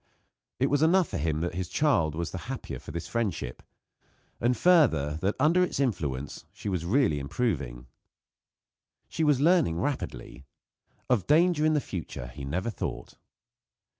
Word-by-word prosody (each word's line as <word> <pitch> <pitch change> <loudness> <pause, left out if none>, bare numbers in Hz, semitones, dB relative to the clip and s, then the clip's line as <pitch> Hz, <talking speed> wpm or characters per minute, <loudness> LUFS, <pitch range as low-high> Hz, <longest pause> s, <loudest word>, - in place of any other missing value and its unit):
It 135 +1 +2
was 145 0 +2
enough 175 +3 +4
for - - -3
him 80 0 -1
that 85 - -2
his 90 0 -4
child 90 - +2
was 85 0 -3
the - - -5
happier - - -5
for - - -12
this 85 +2 -5
friendship; 95 - -3 0.8
and, 120 +1 +1
further, 80 - +3
that 100 +2 0
under 160 +6 +4
its 180 - -2
influence 75 - -2
she 105 +1 -6
was 90 -4 -2
really 105 - +2
improving. 70 - -2 1.2
She 160 - -2
was 150 -4 +3
learning 150 - +3
rapidly. 65 - -4 0.6
Of 120 -7 +1
danger 155 0 +4
in 155 - +2
the - - +3
future 80 - -6
he 70 +3 -8
never 90 +11 -2
thought. - - -5
100 Hz, 155 wpm, -28 LUFS, -, 1.2 s, enough